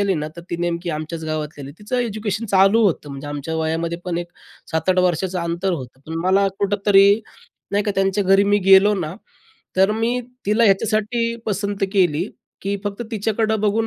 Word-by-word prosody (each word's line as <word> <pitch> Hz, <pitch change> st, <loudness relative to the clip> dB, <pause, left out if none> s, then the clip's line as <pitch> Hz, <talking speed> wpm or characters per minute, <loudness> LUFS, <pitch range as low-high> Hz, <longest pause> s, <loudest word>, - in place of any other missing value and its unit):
आली 200 Hz, -1 st, +2 dB
ना, 150 Hz, -2 st, -3 dB
तर 170 Hz, -, -8 dB
ती 170 Hz, -, -1 dB
नेमकी 170 Hz, 0 st, -2 dB
आमच्याच 160 Hz, +1 st, -5 dB
गावातली 155 Hz, -2 st, -4 dB
आली. 140 Hz, -, -8 dB
तिचं 215 Hz, +5 st, -3 dB
एज्युकेशन 215 Hz, -2 st, -2 dB
चालू 195 Hz, +3 st, +4 dB
होतं. 165 Hz, -6 st, 0 dB
म्हणजे 140 Hz, +1 st, -7 dB
आमच्या 145 Hz, +2 st, -4 dB
वयामध्ये 165 Hz, +1 st, -1 dB
पण 175 Hz, -2 st, -2 dB
एक 175 Hz, -, -4 dB, 0.5 s
7-8 160 Hz, +4 st, +1 dB
वर्षाचं 180 Hz, +1 st, +1 dB
अंतर 170 Hz, +3 st, -1 dB
होतं. 130 Hz, -4 st, -6 dB
पण 160 Hz, +1 st, -4 dB
मला 195 Hz, +1 st, +4 dB
कुठं 200 Hz, 0 st, +1 dB
तरी 200 Hz, +1 st, +6 dB, 0.5 s
नाही 205 Hz, +1 st, +1 dB
का, 210 Hz, -, 0 dB
त्यांच्या 195 Hz, +1 st, +1 dB
घरी 195 Hz, +1 st, +5 dB
मी 205 Hz, +1 st, +3 dB
गेलो 195 Hz, +2 st, +7 dB
ना, 170 Hz, -4 st, -3 dB, 0.6 s
तर 190 Hz, +2 st, +4 dB
मी 230 Hz, +3 st, 0 dB, 0.3 s
तिला 215 Hz, +3 st, +3 dB
ह्याच्यासाठी 215 Hz, +3 st, +1 dB
पसंत 200 Hz, -1 st, -1 dB
केली, 180 Hz, -2 st, +2 dB, 0.3 s
की 200 Hz, +1 st, -1 dB
फक्त 205 Hz, +2 st, -4 dB
तिच्याकडं 220 Hz, 0 st, 0 dB
बघून 215 Hz, +2 st, +1 dB
195 Hz, 180 wpm, -21 LUFS, 170-205 Hz, 0.6 s, गेलो